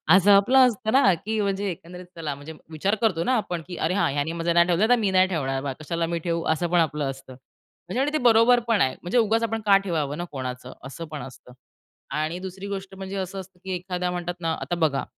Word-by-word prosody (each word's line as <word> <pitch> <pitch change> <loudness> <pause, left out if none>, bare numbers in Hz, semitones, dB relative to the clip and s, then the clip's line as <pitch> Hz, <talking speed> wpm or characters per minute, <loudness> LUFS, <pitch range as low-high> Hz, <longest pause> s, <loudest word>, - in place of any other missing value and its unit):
असं 200 +2 +5
आपलं 255 +7 +6
असतं 220 -2 -2
ना 255 -9 +5
की 215 +6 -3
म्हणजे 200 0 -1
एकंदरीत 180 +1 -8
चला 155 -4 -3
म्हणजे 145 +3 -10 0.2
विचार 195 +7 0
करतो 185 -8 +2
ना 255 - +2
आपण, 175 -5 -3
की 180 - -6
"अरे, - - 0
हां, 200 -6 +1
ह्यानी 145 +2 -1
माझं 170 0 -1
नाही 170 +1 +5
ठेवलं, 180 +5 +2
तर 245 - +7
मी 205 -3 +1
नाही 185 0 +4
ठेवणार 135 -7 -2
बा. 140 -2 -2
कशाला 165 +2 -2
मी 170 0 -2
ठेवू." 170 -1 -1
असं 165 +2 +1
पण 175 - +4
आपलं 150 -3 0
असतं. 135 -1 -9
म्हणजे 175 - -8
आणि 290 - +1
ते 310 - +3
बरोबर 230 +2 +5
पण 225 -4 +2
आहे. 130 - +2
म्हणजे 180 +8 -1
उगाचच 225 0 +3
आपण 225 0 -1
का 200 -1 +7
ठेवावं 150 -5 -2
ना 175 - -3
कोणाचं? 125 -2 -6
असं 165 +5 -7
पण 150 -2 -5
असतं 125 -1 -12 0.6
आणि 155 +3 -2
दुसरी 190 +1 -7
गोष्ट 195 -1 -6
म्हणजे 190 0 -6
असं 190 +1 -4
असतं 185 -1 -12
की 190 - -5
एखाद्या 180 0 -3
म्हणतात 175 0 -4
ना 165 -1 0
आता 175 - -2
बघा. 155 -5 +1
180 Hz, 235 wpm, -25 LUFS, 160-200 Hz, 0.6 s, तर